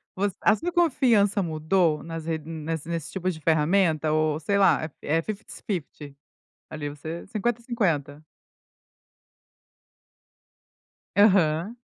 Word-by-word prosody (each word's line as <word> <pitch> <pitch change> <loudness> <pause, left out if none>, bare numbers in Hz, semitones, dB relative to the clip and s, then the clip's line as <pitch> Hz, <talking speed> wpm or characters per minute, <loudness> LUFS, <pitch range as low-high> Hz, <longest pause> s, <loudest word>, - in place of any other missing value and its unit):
voc 200 +1 0
a 215 - +5
sua 345 +8 -3
confiança 245 - +3
mudou 160 -1 +1
nas 165 -1 -6
re 160 -1 -2
nas 160 0 -5
nessa - - -10
nesse 165 -2 -4
tipo 185 -1 -2
de 160 -3 -5
ferramenta? 160 0 +2
Ou, 155 0 +1
sei 200 +6 0
lá, 195 -4 +4 0.2
é 155 +3 0
é - - +1
fifties 215 +3 -8
fifty, 150 - -5 0.6
ali 150 -2 -5
você 155 +4 -7
50, 230 +3 -1
50? 160 - -1 2.9
Aham. 195 0 +3
165 Hz, 125 wpm, -25 LUFS, 155-200 Hz, 2.9 s, a